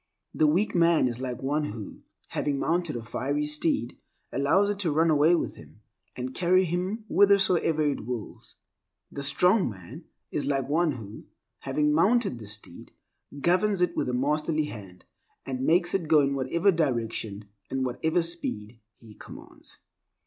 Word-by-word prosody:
The 155 - +3
weak 180 +8 +1
man 170 -5 +4
is 120 -1 -4
like 130 0 -5
one 150 +3 0
who, 105 -5 -7 0.3
having 145 -1 -1
mounted 165 +1 -1
a 120 - -5
fiery 140 +6 -2
steed, 150 -4 -1 0.3
allows 145 +10 +2
it 200 - -5
to 175 -6 0
run 160 +2 +3
away 155 +3 +4
with - - -3
him, - - -16 0.3
and 130 +1 -5
carry 185 +3 +3
him 185 +6 -3
withersoever 190 -6 +3
it 140 -7 -2
wills. 120 -4 -7 0.6
The 140 - -6
strong 180 - +3
man 95 -5 -11 0.3
is - - -2
like 135 -2 0
one 160 +2 +1
who, 110 -4 -10 0.3
having 150 +2 0
mounted 195 - +2
the 110 - -10
steed, 105 +1 -6 0.5
governs 185 +5 +2
it 180 -1 +1
with - - -1
a - - -2
masterly 150 +3 0
hand, 95 -9 -10 0.4
and 130 -1 -4
makes 175 +1 +3
it 175 -5 -1
go 155 -1 +5
in 140 0 +1
whatever 165 +9 +1
direction, 115 - -2 0.2
and 135 0 -2
at - - 0
whatever 160 +7 0
speed 120 -10 -4 0.2
he 110 -2 -15
commands. - - -13
150 Hz, 165 wpm, -27 LUFS, 125-170 Hz, 0.6 s, go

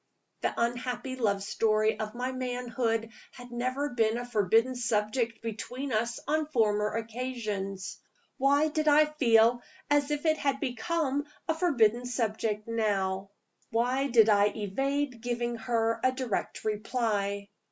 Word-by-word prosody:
The - - +1
unhappy 245 +2 -2
love 200 -6 0
story 215 +1 +1
of 215 +1 -4
my 250 +1 -2
manhood 245 -3 -2 0.2
had 245 0 -12
never 255 +4 -1
been 225 -2 +1
a 245 - -4
forbidden 225 +2 +2
subject 230 0 -1
between 245 +4 -4
us 235 +2 0
on 310 +1 +1
former 210 -7 +1
occasions. 220 -5 -4 0.4
Why 285 +3 +4
did 310 0 -1
I 300 +1 +7
feel 240 -5 +4 0.3
as 290 0 +3
if 295 +1 -2
it 315 -1 +3
had 275 -1 0
become 280 +3 -1 0.2
a 320 - +2
forbidden 245 - +2
subject 220 -3 -1
now? 200 -4 0 0.4
Why 250 +4 +1
did 235 -4 +5
I 205 -2 +5
evade 255 +5 -2
giving 240 0 -2
her 230 0 0
a 255 - +4
direct 255 -6 -3
reply? 210 -2 -1
235 Hz, 135 wpm, -29 LUFS, 215-260 Hz, 0.4 s, I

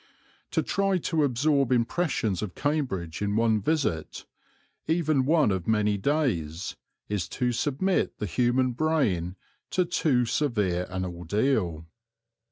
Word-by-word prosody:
To - - 0
try 195 -1 +1
to 160 -2 0
absorb 140 0 +2
impressions 120 - 0
of 105 -4 -5
Cambridge 105 - -2
in 100 0 0
one 110 -1 +2
visit, 135 - -1 0.6
even 155 -5 +2
one 155 -7 +4
of 95 -3 -2
many 105 -1 +2
days, 95 - -1 0.3
is 95 -5 -2
to 125 +4 0
submit 145 +10 0
the 105 - -3
human 125 +7 +1
brain 120 - 0 0.3
to 180 - +1
too 150 -8 +2
severe 105 -10 0
an 95 0 -3
ordeal. 90 - -1
120 Hz, 125 wpm, -27 LUFS, 95-150 Hz, 0.6 s, one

